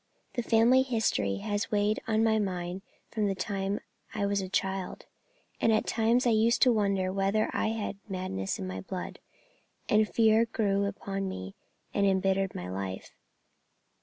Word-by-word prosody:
The 245 - -1
family 230 +3 +5
history 220 - 0
had 205 - -2
weighed 210 0 +1
on 220 0 +2
my 220 -1 +3
mind 180 -2 -3 0.3
from 215 -2 0
the 195 - 0
time 195 +1 -2 0.4
I 205 -2 0
was 200 0 +1
a 190 - -5
child, 190 -1 -2 0.6
and 225 - +4
at 215 - +2
times 230 +3 +2
I 240 - +4
used 225 +2 +4
to 250 -2 +5
wonder 195 -3 +1
whether 195 +2 +1
I - - 0
had 220 -2 -3
madness 185 - -3
in - - -5
my 95 0 -5
blood, 180 - -6 0.7
and 215 - +4
the 215 - -6
fear 225 0 +4
grew 200 -3 0
upon 195 -1 -3
me 95 - -6 0.4
and 200 - +1
embittered 195 0 +1
my 90 - -5
life. 95 0 -5
200 Hz, 165 wpm, -29 LUFS, 190-220 Hz, 0.7 s, family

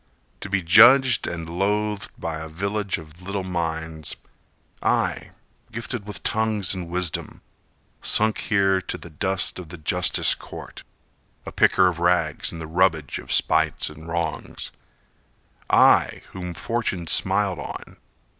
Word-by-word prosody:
To 95 - -7
be 100 -2 0
judged 120 +8 +7
and 85 -1 -5
loathed 100 +4 -1
by 80 -1 -4
a 80 0 -7
village 100 +4 -2
of 80 +1 -13
little 100 +1 -3
minds— 80 -3 -3 0.7
I, - - 0 0.4
gifted 115 -1 -5
with 105 -4 -6
tongues 110 -4 0
and 90 -3 -5
wisdom, 90 -2 -3 0.6
Sunk 110 0 +3
here 95 -3 +2
to - - -5
the 85 - -12
dust 95 +4 0
of 90 -4 -9
the 90 - -8
justice 85 +2 +2
court, - - -10 0.6
A - - -6
picker 95 - +4
of 85 -2 -2
rags 85 -3 +1
in 85 - -8
the 80 - -6
rubbage 80 -3 +1
of - - -9
spites 80 -1 +2
and 80 +2 -12
wrongs,— 85 0 -4 1.0
I, - - +4
whom 90 -2 -6
fortune 110 -5 -2
smiled 95 +2 +1
on! - - -8
90 Hz, 135 wpm, -23 LUFS, 80-100 Hz, 1.0 s, judged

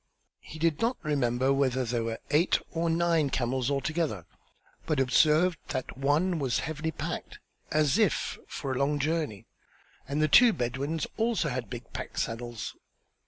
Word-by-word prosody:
He 155 - -11
did 160 -1 +1
not 235 +3 +1
remember 135 -3 +1
whether 130 -2 +1
there 115 0 -1
were 115 0 -3
eight 155 +5 +4
or 165 0 0
nine 165 -3 +2
camels 130 0 0
altogether, 140 - -1 0.6
but 155 -4 +1
observed 155 +6 +4
that 130 - -4
one 150 +6 +1
was 130 -4 0
heavily 160 0 -3
packed 160 - -5 0.3
as 155 +5 +3
if 210 -6 +1
for 140 - -4
a 130 - -1
long 145 +2 +1
journey, 150 - -1 0.6
and 140 +2 -2
the 155 - +4
two 235 +9 +7
Bedouins 135 +5 -2
also 225 -8 +1
had 125 -5 -4
big 120 -1 -8
pack - - -6
saddles. 120 0 -3
145 Hz, 155 wpm, -29 LUFS, 130-160 Hz, 0.6 s, two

